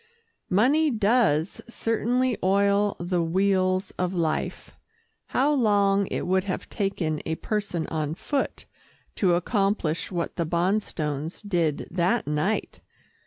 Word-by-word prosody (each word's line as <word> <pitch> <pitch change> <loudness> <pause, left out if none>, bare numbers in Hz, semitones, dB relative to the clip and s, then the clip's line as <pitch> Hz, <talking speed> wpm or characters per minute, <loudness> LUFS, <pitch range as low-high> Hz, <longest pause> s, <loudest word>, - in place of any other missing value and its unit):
Money 275 +11 +3
does 210 - +2
certainly 235 +2 0
oil 200 +2 +2
the 175 0 0
wheels 185 +2 +1
of 180 +1 -1
life. 160 -3 -2 0.6
How 285 +3 +2
long 200 -6 +3
it - - -3
would 190 +1 +1
have 185 - -3
taken 180 -7 -1
a 160 - -1
person 200 -4 -2
on 155 -1 -2
foot 280 +9 -2 0.5
to 180 -4 +3
accomplish 195 -3 0
what 175 -2 -3
the 170 - 0
Bonstones 170 -2 -2
did 170 -6 0
that 180 +7 +1
night! 150 +9 -1
190 Hz, 120 wpm, -26 LUFS, 170-210 Hz, 0.6 s, Money